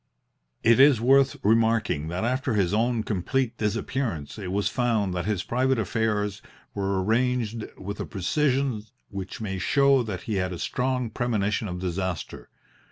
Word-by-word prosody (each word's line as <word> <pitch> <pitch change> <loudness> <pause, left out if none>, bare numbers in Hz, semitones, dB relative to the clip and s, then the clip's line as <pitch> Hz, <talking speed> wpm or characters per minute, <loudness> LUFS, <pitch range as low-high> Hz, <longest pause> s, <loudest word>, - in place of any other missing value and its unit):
It 115 +2 +5
is 135 -3 +7
worth 135 +3 +4
remarking 110 -7 +2
that 90 +5 -3
after 130 +1 0
his 95 -2 +1
own 115 +1 +1
complete 115 +6 -1
disappearance 110 - -2
it 95 -3 -5
was 100 0 0
found 110 -5 0
that 90 -1 -2
his 105 -4 -1
private 130 +2 +1
affairs 105 -1 -1 0.3
were 100 -1 -1
arranged 115 0 0
with 100 +2 -6
a - - -2
precision 130 - 0 0.3
which 95 +1 -6
may 95 -3 -3
show 140 +6 +4
that 100 -6 -5
he 105 -3 -2
had 90 -1 -1
a - - -5
strong 125 +3 -1
premonition 105 -3 -1
of 90 -2 -4
disaster. 90 0 -4
110 Hz, 155 wpm, -26 LUFS, 95-125 Hz, 0.3 s, is